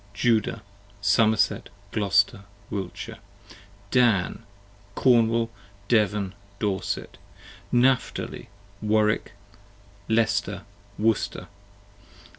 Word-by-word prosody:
Judah, 110 Hz, -1 st, +1 dB, 0.4 s
Somerset, 110 Hz, +2 st, +2 dB, 0.2 s
Glouster, 100 Hz, -1 st, +2 dB, 0.3 s
Wiltshire. 100 Hz, +3 st, -5 dB, 0.7 s
Dan, 115 Hz, -8 st, +3 dB, 0.5 s
Cornwall, 115 Hz, -2 st, +3 dB, 0.4 s
Devon, 105 Hz, -4 st, +2 dB, 0.2 s
Dorset. 100 Hz, -3 st, -3 dB, 0.5 s
Napthali, 125 Hz, +1 st, +1 dB, 0.3 s
Warwick, 105 Hz, -2 st, +1 dB, 0.8 s
Leicester, 110 Hz, -1 st, +1 dB, 0.3 s
Worcester. 110 Hz, 0 st, 0 dB
110 Hz, 60 wpm, -25 LUFS, 100-115 Hz, 0.8 s, Dan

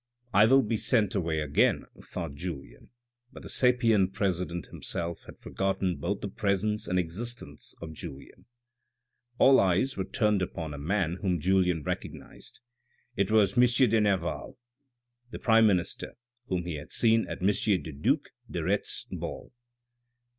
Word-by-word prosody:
" 120 Hz, 0 st, -35 dB
I 110 Hz, -, +7 dB
will 135 Hz, +2 st, +5 dB
be 110 Hz, +1 st, -1 dB
sent 105 Hz, -4 st, +1 dB
away 85 Hz, -5 st, -1 dB
again," 75 Hz, -1 st, +2 dB, 0.2 s
thought -, -, -6 dB
Julien, 70 Hz, -6 st, -7 dB, 0.4 s
but -, -, -12 dB
the -, -, -9 dB
sapient 115 Hz, -7 st, +3 dB
president 90 Hz, -5 st, -2 dB
himself 85 Hz, 0 st, -5 dB
had -, -, -12 dB
forgottoti 95 Hz, -1 st, -1 dB
both 95 Hz, +3 st, -2 dB
the -, -, -3 dB
presence 105 Hz, +2 st, -1 dB
and 90 Hz, -, 0 dB
existence 110 Hz, +8 st, -5 dB
of 80 Hz, -1 st, -7 dB
Julien. 75 Hz, -4 st, -10 dB, 0.9 s
All 135 Hz, +1 st, +6 dB
eyes 95 Hz, +8 st, +2 dB
were 95 Hz, -, -2 dB
turned 105 Hz, -5 st, +1 dB
upon 80 Hz, -4 st, -4 dB
a 70 Hz, -, -7 dB
man 90 Hz, +2 st, -1 dB
whom 90 Hz, -4 st, 0 dB
Julien 90 Hz, -2 st, +2 dB
recognised. -, -, -7 dB, 0.5 s
It 100 Hz, 0 st, +1 dB
was 105 Hz, -3 st, +3 dB
M. 125 Hz, -, +6 dB, 0.3 s
de 115 Hz, -1 st, +4 dB
Nerval, 95 Hz, -1 st, -1 dB, 0.7 s
the -, -, -7 dB
prime 115 Hz, -1 st, +5 dB
minister, 90 Hz, -4 st, -1 dB, 0.3 s
whom 90 Hz, -2 st, -1 dB
he 85 Hz, -3 st, -4 dB
had 70 Hz, -, -10 dB
seen 115 Hz, -1 st, +3 dB
at -, -, -6 dB
M. 95 Hz, -, +4 dB
the 100 Hz, -5 st, 0 dB
due 70 Hz, +1 st, +1 dB, 0.3 s
de -, -, -3 dB
Retz's -, -, -1 dB
ball. -, -, -6 dB
95 Hz, 155 wpm, -28 LUFS, 85-110 Hz, 0.9 s, I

